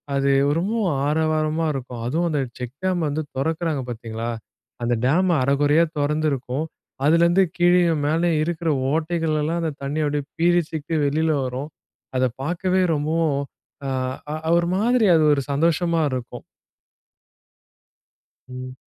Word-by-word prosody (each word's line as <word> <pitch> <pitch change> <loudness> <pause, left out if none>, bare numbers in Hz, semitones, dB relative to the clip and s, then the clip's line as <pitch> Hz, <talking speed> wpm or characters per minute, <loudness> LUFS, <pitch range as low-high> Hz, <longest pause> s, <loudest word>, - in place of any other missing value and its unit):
அது 140 0 +2 0.3
ரொம்பவும் 190 -5 0
ஆரவாரமா 155 +1 +1
இருக்கும். 125 -3 -6
அதுவும் 165 +7 0
அந்த 145 - 0 0.2
செக் 125 +1 -6
டேம் 180 -4 +1
வந்து 150 +2 -1
திறக்குறாங்க 160 +1 -1
பார்த்தீங்களா! 115 0 -5 0.5
அந்த 120 0 +1
டேம் 175 +7 +3
அரகுறையா 145 +4 +3
தொறந்திருக்கும், 145 -1 -1 0.4
அதுலேருந்து 170 +4 +4
கீழேயும் 175 -3 +3
மேலேயும் 165 0 +2
இருக்கிற 165 0 -2 0.2
ஓட்டைகளெல்லாம் 160 0 0
அந்த 160 -2 -1
தண்ணி 145 +3 -1
அப்பிடியே 145 -1 -1
பீரிட்டு 165 -2 +1
வெளில 160 +3 +1 0.2
வரும். 130 +4 -4 0.5
அத 130 - +3 0.2
பார்க்கவே 185 +3 +1
ரொம்பவும் 155 -1 0 0.5
அ - - -1 0.6
அ - - +3
ஒரு 170 0 +1
மாதிரி 235 +1 +3
அது 155 - +4
ஒரு 140 - +1
சந்தோஷமா 165 +3 +1
இருக்கும். 125 -2 -5 2.1
ம். 130 0 -7
155 Hz, 120 wpm, -22 LUFS, 140-170 Hz, 2.1 s, அதுலேருந்து